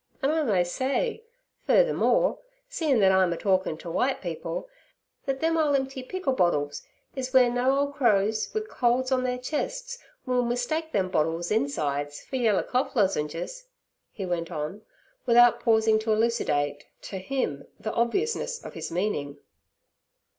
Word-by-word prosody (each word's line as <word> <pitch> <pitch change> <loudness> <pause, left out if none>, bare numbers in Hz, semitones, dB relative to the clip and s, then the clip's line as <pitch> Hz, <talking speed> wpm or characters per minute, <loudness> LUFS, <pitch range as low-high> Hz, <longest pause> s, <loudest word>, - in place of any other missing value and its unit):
'An' 275 - +3
I 320 0 +1
may 205 -11 +2
say, 270 - -1 0.5
furthermore, - - +3 0.3
seein' 320 - +1
thet 190 -2 +5
I'm 190 -2 +3
a - - -5
talkin' 185 -5 +1
ter 170 - -8
w'ite 265 +9 +1
people, 200 - -5 0.6
thet 270 0 -1
them 325 0 +2
ole 295 -2 +3
emp'y 270 -1 -2
pickle 275 +1 -2
bottles 145 - +1 0.3
is 260 -1 -3
w'eere 250 -2 +5
no 265 +3 +2
crows 220 -7 +1
wi' 435 - -1
colds 255 - 0
on 255 -1 +2
their 250 0 -1
chests - - -4 0.3
will 250 -1 +2
mistake 245 +7 -1
them 190 -3 0
bottles' 165 +1 0
insides 145 - -1
fer 265 - -5
yeller 225 -5 +2
cough 255 +2 -1
lozengers' 190 - -1 0.5
he 195 - -5
went 170 -2 -2
on, 155 +7 -4 0.5
without 240 0 +6
pausing 220 -1 +3
to 220 0 -1
elucidate 150 -11 0 0.2
theto 190 -2 -6
him, 190 - -3 0.2
obviousness 395 - -1
of - - -8
his - - -6
meaning. 165 -6 -2
240 Hz, 145 wpm, -26 LUFS, 185-275 Hz, 0.6 s, without